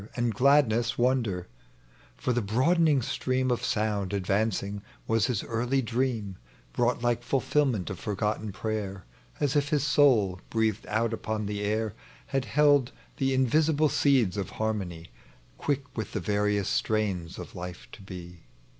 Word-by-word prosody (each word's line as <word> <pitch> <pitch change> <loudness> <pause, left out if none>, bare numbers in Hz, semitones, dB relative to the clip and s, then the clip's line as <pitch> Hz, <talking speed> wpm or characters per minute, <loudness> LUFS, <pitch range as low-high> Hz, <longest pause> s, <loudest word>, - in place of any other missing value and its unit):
33 120 - -1
And 120 -2 +1
gladness 120 -2 +3
wonder; 120 -8 +1 0.7
for 125 - 0
the 120 - +1
broadening 140 - +3
stream 130 +2 0
Of 120 - -1
sound 105 -2 -1
advancing 100 +1 0 0.2
was 110 -1 +2
his 120 -6 -1
early 120 +4 0
dream, 115 -5 -1 0.4
Brought 120 0 +1
like 120 -1 +1
fulfilment 130 -4 +1
of 95 - -6
forgotten 105 0 -2
prayer; 100 -2 -4 0.3
As 145 0 0
if 145 -1 +2
his 150 -3 +1
soul, 125 -11 +3
breathed 110 -2 0
out 115 +2 0
upon 110 -1 -3
the 105 0 -3
air, 110 +1 -1 0.3
Had 135 -2 -1
held 145 -3 +4 0.3
the 135 0 +1
invisible 150 +4 +3
seeds 125 -12 +2
of 100 -3 -2
harmony 95 -7 -3 0.5
Quick 140 -1 -2
with 110 - -4
the - - -1
various 105 -1 0
strains 100 -6 -1
of - - -8
life 90 0 -7
to 110 - -12
be. 90 -5 -10
110 Hz, 145 wpm, -28 LUFS, 100-130 Hz, 0.7 s, held